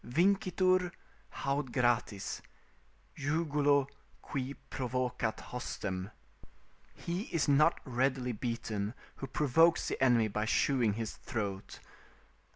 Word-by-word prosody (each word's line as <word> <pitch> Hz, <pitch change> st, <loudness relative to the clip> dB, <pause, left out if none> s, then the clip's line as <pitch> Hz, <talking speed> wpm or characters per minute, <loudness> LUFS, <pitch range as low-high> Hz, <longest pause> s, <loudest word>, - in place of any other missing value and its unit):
] -, -, -34 dB
"Vincitur 185 Hz, +3 st, +2 dB, 0.4 s
haud 140 Hz, -1 st, -2 dB
gratis, 120 Hz, -5 st, 0 dB, 0.7 s
jugulo 145 Hz, -2 st, +2 dB, 0.4 s
qui 135 Hz, 0 st, -3 dB, 0.2 s
provocat 125 Hz, -3 st, -1 dB
hostem." 95 Hz, -6 st, -4 dB, 0.9 s
["He 175 Hz, +5 st, -3 dB
is 165 Hz, -4 st, +1 dB
not 150 Hz, +4 st, +4 dB
readily 130 Hz, -1 st, 0 dB
beaten 115 Hz, -2 st, -3 dB, 0.2 s
who 135 Hz, -, -5 dB
provokes 150 Hz, +5 st, +3 dB
the -, -, -1 dB
enemy 120 Hz, -4 st, +5 dB
by 105 Hz, +1 st, -1 dB
shewing 120 Hz, -2 st, +2 dB
his 110 Hz, 0 st, -4 dB
throat." 100 Hz, -4 st, -4 dB
130 Hz, 100 wpm, -32 LUFS, 115-145 Hz, 0.9 s, enemy